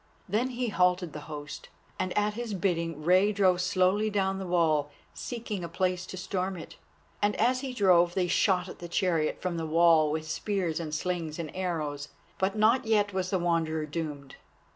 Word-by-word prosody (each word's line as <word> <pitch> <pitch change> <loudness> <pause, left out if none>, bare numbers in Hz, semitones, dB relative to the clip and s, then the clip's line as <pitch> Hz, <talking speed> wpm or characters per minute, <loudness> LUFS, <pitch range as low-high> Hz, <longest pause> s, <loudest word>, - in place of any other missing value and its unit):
Then 215 +6 +1
he 245 -1 -2
halted 180 -3 +1
the 150 - -6
host, 145 -1 -7 0.3
and 185 -1 -1
at 210 0 +2
his 230 -2 -4
bidding 165 -4 -1
Rei 185 +5 +4
drove 190 -3 +3
slowly 185 +3 +2
down 195 -2 0
the 190 - -5
wall 160 -4 +2 0.2
seeking 225 -6 -5
a 170 - -5
place 180 +1 -1
to 185 - -7
storm 185 0 -3
it, 165 - -10 0.5
and 205 0 +2
as 250 +3 +2
he 265 0 -4
drove 180 -6 +4
they 185 - +2
shot 185 0 +2
at - - -10
the 175 - -8
chariot 165 -4 0
from 180 -2 -2
the 165 -1 -3
wall 165 -1 +5
with 155 +1 -3
spears 180 -1 -2
and 155 -2 -4
slings 165 -2 -3
and 165 -3 -6
arrows. 155 -6 -3 0.3
But 190 +2 0
not 225 +4 +3
yet 205 -2 +2
was 185 -1 -1
the 190 - +1
Wanderer 165 -3 0
doomed. 150 -3 -6
180 Hz, 185 wpm, -28 LUFS, 165-200 Hz, 0.5 s, wall